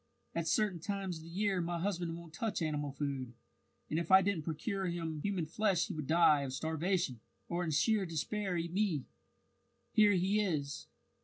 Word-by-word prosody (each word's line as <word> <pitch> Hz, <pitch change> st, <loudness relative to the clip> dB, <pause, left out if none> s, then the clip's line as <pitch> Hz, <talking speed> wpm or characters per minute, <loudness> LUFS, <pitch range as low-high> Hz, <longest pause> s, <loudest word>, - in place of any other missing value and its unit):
At 165 Hz, -1 st, -1 dB
certain 200 Hz, -1 st, +2 dB
times 195 Hz, 0 st, -3 dB
of 160 Hz, -, -11 dB
the -, -, -10 dB
year 190 Hz, +1 st, 0 dB
my 170 Hz, 0 st, -2 dB
husband 175 Hz, -3 st, -2 dB
won't 170 Hz, -2 st, -11 dB
touch 210 Hz, 0 st, -2 dB
animal 150 Hz, -2 st, -1 dB
food, 135 Hz, -3 st, -3 dB, 0.5 s
and 155 Hz, -, 0 dB
if 170 Hz, -, -3 dB
I 190 Hz, 0 st, +8 dB
didn't 200 Hz, -4 st, 0 dB
procure 190 Hz, +4 st, -2 dB
him 165 Hz, -3 st, -3 dB
human 190 Hz, -3 st, -1 dB
flesh 185 Hz, +2 st, +1 dB
he -, -, -3 dB
would 150 Hz, -3 st, -4 dB
die 160 Hz, -3 st, +5 dB
of 135 Hz, -2 st, -4 dB
starvation, 160 Hz, -2 st, -1 dB, 0.3 s
or 175 Hz, +1 st, -1 dB
in 170 Hz, -, -1 dB
sheer 195 Hz, +6 st, +2 dB
despair 180 Hz, +4 st, -2 dB
eat 170 Hz, 0 st, -3 dB
me. 185 Hz, -9 st, +1 dB, 0.9 s
Here 210 Hz, -1 st, +6 dB
he 190 Hz, +3 st, +2 dB
is." 150 Hz, -6 st, -2 dB
170 Hz, 180 wpm, -34 LUFS, 155-195 Hz, 0.9 s, I